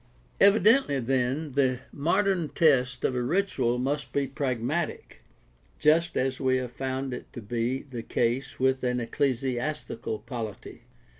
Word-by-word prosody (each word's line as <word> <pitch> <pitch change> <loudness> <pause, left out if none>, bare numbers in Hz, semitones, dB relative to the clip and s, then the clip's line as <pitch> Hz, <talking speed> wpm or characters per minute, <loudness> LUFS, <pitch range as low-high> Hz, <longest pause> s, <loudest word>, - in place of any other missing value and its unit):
Evidently, 205 - +5
then, 130 +4 0
the 130 -2 +1
modern 175 +2 +1
test 125 -6 +2
of - - +1
a 125 - -1
ritual 130 -5 +1
must 140 +4 -2
be 140 -1 +1
prag 135 -2 -2
matic, 155 +9 -3 0.6
just 165 +3 +3
as 130 0 0
we 130 -1 +2
have 125 -2 -4
found 130 +1 -3
it 125 - -8
to - - -6
be 120 +4 -2
the 130 -5 -7
case 120 +3 -1
with 130 0 +2
an 125 0 +1
ecclesi 125 +1 0
astical 120 -6 -4
polity. 115 -4 -7
130 Hz, 145 wpm, -27 LUFS, 125-150 Hz, 0.6 s, Evidently